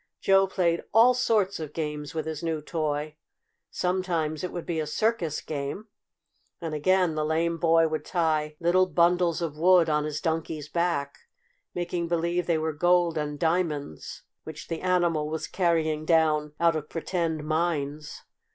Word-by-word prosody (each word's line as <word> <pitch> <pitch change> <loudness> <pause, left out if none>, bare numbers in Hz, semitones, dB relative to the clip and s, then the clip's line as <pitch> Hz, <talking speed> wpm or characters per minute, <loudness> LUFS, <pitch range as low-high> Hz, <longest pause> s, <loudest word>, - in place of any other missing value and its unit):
Joe 195 0 +4
played 170 -3 0
all 235 +3 +7
sorts 215 -7 +1
of 155 -2 -6
games 150 -1 -4
with 160 - -2
his 160 -2 -4
new 165 -2 -2
toy. 150 -1 -3 0.5
Sometimes 180 -4 -1
it 180 - -3
would 175 - -6
be 165 -2 -2
a 155 - -2
circus 170 -2 -1
game, 150 +9 -5 0.7
and 165 -2 -5
again 180 +3 +2
the 155 0 -1
lame 165 +2 0
boy 165 -1 +4
would 155 0 -3
tie 155 -3 0
little 180 +2 +3
bundles 175 -1 +2
of 150 -2 -4
wood 175 -1 +5
on 150 0 +1
his 150 0 -3
Donkey's 160 -3 -3
back, 170 -5 -1 0.6
making 175 -1 -2
believe 170 +1 -1
they 170 -2 +2
were 160 0 -2
gold 175 +1 +2
and 150 -1 -3
diamonds 160 - -2 0.2
which 155 -1 -9
the 165 -1 -3
animal 175 -4 +1
was 160 0 -3
carrying 160 -4 0
down 155 -2 +2
out 170 -1 +3
of 150 -1 -4
pretend 165 -2 -2
mines. 155 -2 -2
165 Hz, 160 wpm, -26 LUFS, 155-175 Hz, 0.7 s, all